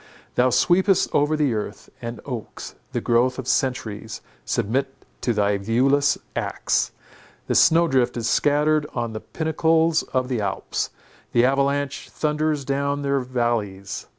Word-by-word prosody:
Thou 125 +1 +3
sweepest 185 - +3
over 150 +2 +2
the 145 -5 +2
earth, 105 -1 -5
and 120 0 -6
oaks, 125 -6 -6 0.2
the - - -2
growth 125 +2 +2
of 130 -2 -6
centuries, 110 -5 -1 0.2
submit 135 +6 0 0.3
to 120 - +1
thy 105 -2 +1
viewless 135 +7 +2 0.2
axe; - - 0 0.5
the - - -1
snow 170 +1 +5
drift 130 -4 +1
is 115 -1 -1
scattered 150 +1 +2
on 120 -2 -2
the 110 - -4
pinnacles 160 +2 +1
of 130 -1 -2
the 125 -4 -1
Alps, 100 -1 -2 0.4
the 120 +1 +5
avalanche 140 +1 0
thunders 150 -2 -1
down 140 +1 -1
their 140 0 +1
vallies. 120 -6 -2
130 Hz, 140 wpm, -23 LUFS, 120-145 Hz, 0.5 s, snow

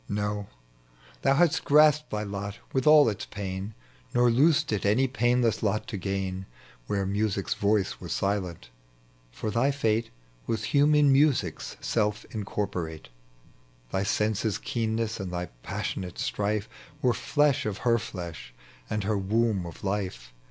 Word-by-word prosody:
No, 105 0 -2 0.7
thon 135 0 +3
haxist 170 0 +3
grasped 150 0 +5
thy 105 0 -2
lot 100 0 -5 0.2
with 130 +1 +1
all 150 -2 +8
its 105 -2 -2
pain, 100 +1 -5 0.4
Nor 120 0 +5
loosed 140 +6 +3
it 105 - -1
any 110 +7 +3
painless 120 -3 +1
lot 110 0 0
to 115 - -4
gain 95 0 -3 0.4
Where 100 -1 0
music's 100 0 0
voice 100 -1 +1
was - - -6
silent; 90 -10 -2 0.6
for 105 - -4
thy 120 +5 +2
fate 115 -5 0 0.4
Was 110 -1 -1
human 145 +1 +4
music's 135 - +1
self 105 -2 0
incorporate: 95 - -4 0.8
Thy 95 - 0
senses' 105 +1 0
keenness 115 -1 -2
and 95 -2 -4
thy 90 -1 -3
passionate 90 +6 -4
strife 105 +1 -1 0.4
Were 125 -2 +4
flesh 145 -2 +1
of 105 - -3
her 115 -1 +4
flesh 85 - -7 0.3
anrl 105 -1 -1
her 105 +1 0
womb 105 -2 +1
of 85 - -11
life. 95 -13 -3
105 Hz, 140 wpm, -27 LUFS, 95-120 Hz, 0.8 s, all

